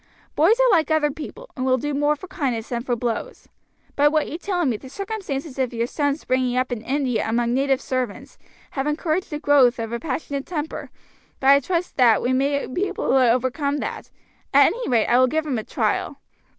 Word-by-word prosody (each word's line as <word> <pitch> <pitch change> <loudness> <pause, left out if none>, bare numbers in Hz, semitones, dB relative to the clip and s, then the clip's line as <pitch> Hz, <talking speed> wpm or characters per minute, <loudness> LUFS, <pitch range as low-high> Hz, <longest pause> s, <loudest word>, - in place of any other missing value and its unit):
Boys 385 +11 +4
are - - +5
like 330 -5 +3
other 310 -2 +2
people, 455 - -9
and 255 - -3
will 260 0 +3
do 290 +3 -3
more 290 +1 +2
for 305 - -10
kindness 260 -11 -3
than 240 -1 -2
for 245 0 -1
blows. 240 - -4 0.5
By 290 +1 +4
what 305 0 +1
you 325 - -6
tell 355 -3 -1
me, 250 -5 +1
the 260 +5 -10
circumstances 320 -8 -5
of 255 -2 -1
your 230 0 0
son's 285 +3 -2
bringing 255 -1 +1
up 255 0 0
in 240 -3 -3
India 255 -2 -1
among 235 +1 +1
native 270 0 +2
servants 255 -6 -4 0.3
have 270 +1 -2
encouraged 315 +4 -1
the 300 - -3
growth 275 -4 +4
of 230 0 -4
a 235 - -2
passionate 280 -1 -4
temper, 315 -3 -4 0.5
but 270 0 +5
I 280 - +7
trust 340 +2 -3
that 240 -4 +5
we 255 - +1
may 280 +2 +1
be 365 +10 -2
able - - -4
to 260 -3 +4
overcome 270 +4 0
that; - - -5 0.5
at - - +8
any - - -5
rate 235 -3 +3
I 245 - +3
will 255 - +5
give 315 +4 -1
him 265 -6 -1
a - - -5
trial." - - -1
275 Hz, 215 wpm, -23 LUFS, 250-310 Hz, 0.5 s, at